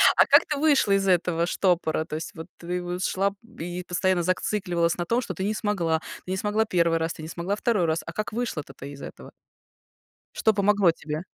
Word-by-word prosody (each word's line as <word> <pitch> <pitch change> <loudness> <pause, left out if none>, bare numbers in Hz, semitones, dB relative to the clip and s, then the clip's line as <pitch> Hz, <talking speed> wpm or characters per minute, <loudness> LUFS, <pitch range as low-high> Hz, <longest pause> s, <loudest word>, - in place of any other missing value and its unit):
А - - +6
как - - +6
ты 300 - -1
вышла 285 -8 +3
из 195 0 +2
этого 175 -2 +2
штопора? 175 -3 +1
То 155 - -6
есть 160 - -5
вот 160 0 -8
ты 180 +1 -3
вот 180 +1 -4
шла 195 +2 +1 0.3
и 175 +1 -4
постоянно 180 0 +1
зацикливалась 180 -2 0
на 175 - -2
том, 235 +7 +1
что 205 - -5
ты 190 - -3
не 210 +2 0
смогла, 185 -7 0 0.3
ты 185 - -5
не 190 - -1
смогла 210 +3 +1
1 170 -3 +2
раз, 165 0 -1
ты - - -11
не 155 - -6
смогла 170 +4 -2
2 210 -4 +1
раз. 160 0 0
А 170 - -7
как 215 +2 -3
вышла-то 215 - -3
ты 140 +2 -9
из 140 - -11
этого? - - -10 1.0
Что 220 - +3
помогло 200 -2 +4
тебе? 155 +1 -5
180 Hz, 215 wpm, -25 LUFS, 165-205 Hz, 1.0 s, А